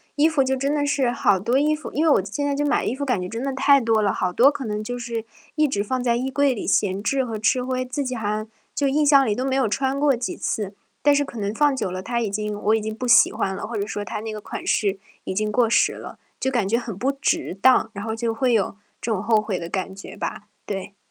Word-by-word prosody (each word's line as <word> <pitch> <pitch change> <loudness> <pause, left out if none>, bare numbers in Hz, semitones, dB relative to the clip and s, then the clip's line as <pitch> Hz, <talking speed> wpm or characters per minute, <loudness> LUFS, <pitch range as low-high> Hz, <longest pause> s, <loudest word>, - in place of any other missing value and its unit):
衣 295 +2 +4
服 310 -4 +2
就 265 0 0
真 275 +3 -1
的 295 - +1
是 280 -4 +1
好 205 -5 +2
多 240 +7 +1
衣 305 +1 +2
服 305 - -8
因 305 - +1
为 320 - +4
我 195 -10 +3
现 210 +8 -3
在 285 -1 0
就 290 - 0
买 290 - +1
衣 245 - -1
服， 285 +1 -3
感 245 -8 0
觉 180 - -5
真 230 +4 -4
的 275 -1 -2
太 280 +1 +5
多 225 -3 +2
了， 200 -2 +2
好 180 -1 -1
多 255 +9 +6
可 285 -2 -5
能 210 -1 -3
就 245 +3 -4
是， 235 -2 -4 0.3
一 305 -1 +2
直 205 -7 -1
放 255 +4 -2
在 235 -1 +2
衣 260 +3 -2
柜 280 -2 +2
里 - - -5
闲 200 0 +1
置 265 +2 +1
和 225 -3 -4
吃 250 +4 +1
灰， 255 0 -2
自 270 +3 -3
己 255 -1 -3
好 220 -3 -3
像 215 +1 -2 0.3
就 285 - +1
印 295 +2 +2
象 280 -1 +6
里 205 - +1
都 255 +2 -2
没 265 0 0
有 260 -5 +2
穿 270 +5 0
过 285 -2 +3
几 245 - -3
次， 205 -2 -3 0.3
但 290 0 +5
是 285 - +3
可 255 - -9
能 205 +1 -2
放 290 +2 +3
久 210 -8 -2
了 185 - -4
它 235 +4 -2
已 220 -4 -1
经 210 0 -3
我 215 +2 +3
已 220 - 0
经 215 0 -4
不 250 - -4
喜 235 - +6
欢 190 -1 -2
了， - - -5
或 230 -2 -4
者 200 - -1
说 205 -1 -4
它 205 - -5
那 220 0 -5
个 210 - -6
款 - - -7
式 200 -2 +1 0.3
已 190 - -3
经 215 +1 0
过 235 +1 +2
时 - - +3
了， - - -9 0.2
就 265 - 0
感 240 -7 0
觉 230 +4 +2
很 225 -6 -6
不 260 +6 +1
值 285 - -1
当， 255 -3 +5
然 200 - -6
后 220 0 -3
就 225 0 -1
会 245 +2 +1
有 205 -3 +1 0.2
这 230 - -3
种 200 -4 0
后 220 +1 +3
悔 210 -4 -3
的 170 - -6
感 190 +1 -3
觉 195 - -10
吧。 - - -5 0.2
对。 195 0 -5
235 Hz, 315 characters per minute, -23 LUFS, 210-270 Hz, 0.3 s, 多